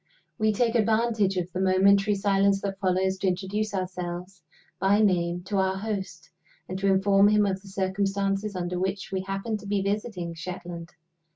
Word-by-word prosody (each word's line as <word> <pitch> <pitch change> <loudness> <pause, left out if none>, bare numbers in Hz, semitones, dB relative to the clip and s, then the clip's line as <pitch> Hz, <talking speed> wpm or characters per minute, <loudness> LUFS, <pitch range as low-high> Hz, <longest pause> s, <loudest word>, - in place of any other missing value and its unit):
We 215 0 +3
take 230 +2 +1
advantage 220 -3 +2
of 180 0 -2
the 185 - -3
momentary 195 +2 +4
silence 195 0 +2
that 195 -1 -4
follows 190 0 +1
to 195 - 0
introduce 195 +4 -1
ourselves 180 -1 -5 0.4
by 195 +2 +3
name 175 -4 +1
to 200 +2 -2
our 190 0 +1
host, 190 -5 -5 0.4
and 185 - -5
to 200 - 0
inform 195 +1 +4
him 210 0 +4
of 190 -1 -1
the 200 - -16
circumstances 195 +1 -1
under 180 0 -2
which 190 +1 -3
we 190 -1 -1
happen 195 +3 -3
to 200 0 -11
be 200 -1 0
visiting 200 -4 -3
Shetland. 175 0 -7
195 Hz, 170 wpm, -26 LUFS, 185-205 Hz, 0.4 s, momentary